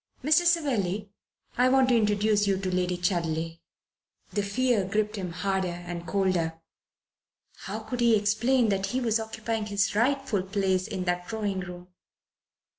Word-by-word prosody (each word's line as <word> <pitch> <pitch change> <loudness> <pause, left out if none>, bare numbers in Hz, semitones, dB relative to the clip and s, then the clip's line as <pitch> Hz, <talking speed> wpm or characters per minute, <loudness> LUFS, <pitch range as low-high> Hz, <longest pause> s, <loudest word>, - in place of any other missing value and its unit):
"Mr. 310 +5 +4
Savelli, 215 - +1 0.5
I 250 +1 +5
want 260 0 +4
to 245 - +4
introduce 210 -1 +2
you 195 -1 +2
to 185 -1 -3
Lady 180 0 0
Chudley." 165 -2 -1 0.7
The 205 - +1
fear 225 +2 +1
gripped 210 +3 -1
him 185 -4 -4
harder 190 +1 -1
and 175 -1 -6
colder. 175 -4 0 1.1
How - - -4
could 250 - -5
he 235 -2 +5
explain 220 +4 +2
that 195 -1 0
he 255 - -1
was 230 -3 +1
occupying 220 0 -3
his 205 +1 +1
rightful 255 -1 +1
place 190 0 0
in 190 -4 -3
that 180 0 -2
drawing 210 -4 -2
room? 180 0 -8
205 Hz, 150 wpm, -27 LUFS, 185-225 Hz, 1.1 s, I